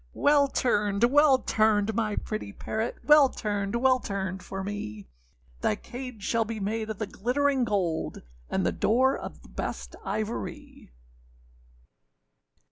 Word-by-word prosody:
â - - -11
âWell 285 -1 +4
turned, 205 -4 +1
well 280 +2 +6
turned, 215 -3 +2
my 215 -1 0
pretty 215 -1 -4
parrot, 220 +3 -3
Well 295 -2 +7
turned, 205 -2 -2
well 255 +1 +4
turned 190 -4 -4
for 195 +1 -6
me; 110 - -5 0.5
Thy 105 - +1
cage 250 -4 -8
shall 230 +2 +1
be 220 0 -5
made 215 +2 -2
of 220 - -4
the 215 - -2
glittering 260 +6 +1
gold, 180 -7 -1 0.3
And - - 0
the - - +2
door 260 +5 +3
of - - -8
the - - -16
best - - -5
ivory. 215 - -5
220 Hz, 140 wpm, -27 LUFS, 200-255 Hz, 0.5 s, Well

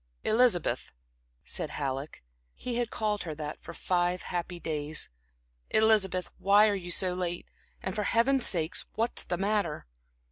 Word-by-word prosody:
"Elizabeth," 220 -6 +2 0.5
said - - -3
Halleck 135 - -4 0.3
(he 245 -2 -4
had 240 -2 0
called 210 -3 -1
her 160 -3 -5
that 150 -1 -6
for - - -8
five 180 0 0
happy 175 0 -3
days) 155 -1 -1 0.6
"Elizabeth, 205 -5 +3
why 205 +2 +6
are 210 - +2
you 180 -3 -4
so 180 +1 +2
late? 175 -1 -3 0.4
And, 190 - -2
for 210 -1 -1
Heaven's 250 +4 +4
sake, 165 -2 0 0.2
what's 230 +2 0
the 175 - -2
matter?" 200 -4 0
185 Hz, 145 wpm, -29 LUFS, 170-215 Hz, 0.6 s, why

